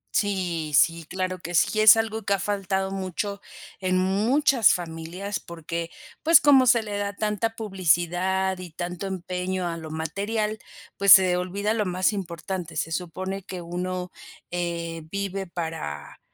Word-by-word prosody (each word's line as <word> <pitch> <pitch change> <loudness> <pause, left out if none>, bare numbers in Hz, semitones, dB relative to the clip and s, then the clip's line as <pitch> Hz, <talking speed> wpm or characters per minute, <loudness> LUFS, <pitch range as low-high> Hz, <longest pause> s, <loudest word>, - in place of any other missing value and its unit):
Sí, 175 -6 -1
sí, 165 +2 +3
claro 185 0 -3
que 175 +1 -5
sí. 215 +6 +3
Es 215 +1 +9
algo 225 0 -1
que 200 - 0
ha 200 - 0
faltado 195 -1 -1
mucho 195 +1 -4 0.4
en 185 -1 0
muchas 220 +6 +3
familias 175 +3 -5
porque, 170 0 -6 0.3
pues, 330 -1 +7
como 270 -3 +5
se 235 -2 +5
le 205 -1 -4
da 200 0 -2
tanta 215 +2 -1
publicidad 190 -1 0
y 180 -1 -7
tanto 175 +3 -5
empeño 185 0 -3
a 170 - -3
lo 160 -1 -8
material, 205 +7 -2 0.4
pues 200 0 +8
se 185 -2 +6
olvida 195 +4 -1
lo 215 -3 0
más 185 +3 +1
importante. 180 -2 -5
Se 165 - -2
supone 185 +3 -4
que 185 -2 -7
uno, 180 +1 -4 0.4
eh, 170 -1 -3
vive 195 -1 -3
para 160 - -6
185 Hz, 150 wpm, -25 LUFS, 175-200 Hz, 0.4 s, Es